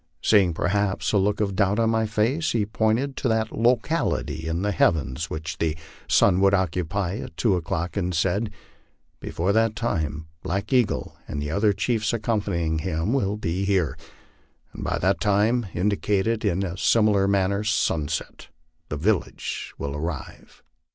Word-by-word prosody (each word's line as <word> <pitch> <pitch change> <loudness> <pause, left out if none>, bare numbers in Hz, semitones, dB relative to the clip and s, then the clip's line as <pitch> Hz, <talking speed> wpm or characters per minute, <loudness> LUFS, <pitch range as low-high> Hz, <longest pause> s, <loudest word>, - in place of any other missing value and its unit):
Seeing, 95 -6 +4
perhaps, 100 +2 0
a 100 - +4
look 105 +2 +1
of 100 -3 0
doubt 100 0 +2
on 115 -1 +2
my 110 -1 +1
face, 115 +10 0
he 110 -3 +1
pointed 110 +6 0
to - - -1
that 110 -1 +1
locality 125 - 0
in 85 +3 -1
the 105 - +1
heavens 80 -5 +1
which 80 0 -5
the 80 -1 0 0.3
sun 95 -2 +4
would 100 0 +5
occupy 90 +1 -1
at - - -8
two 105 -6 +2
o'clock, 85 0 -3
and 90 -3 -1
said, 100 +6 +1 0.4
" - - -40 0.3
Before 90 +4 -1
that 110 0 +2
time 80 - -2 0.2
Black 100 +7 -3
Eagle 125 -4 +1
and 75 - -4
the 75 +1 -3
other 105 +5 +3
chiefs 110 +2 0
accompanying 100 -8 -1
him 85 +5 -1
will 105 -6 0
be 95 -2 -2
here; 95 -8 +1 0.8
and - - -7
by - - -1
that 95 +2 +1
time," 105 +3 +2
indicating 100 +3 0
in 100 -2 0
a 95 -1 -4
similar 105 -3 +3
manner 100 +1 +1
sunset, 80 -7 -1 0.2
" 80 0 -45
the 75 - -3
village 95 +5 -1
will 70 0 -4
arrive." 80 -1 -6
100 Hz, 165 wpm, -24 LUFS, 85-110 Hz, 0.8 s, would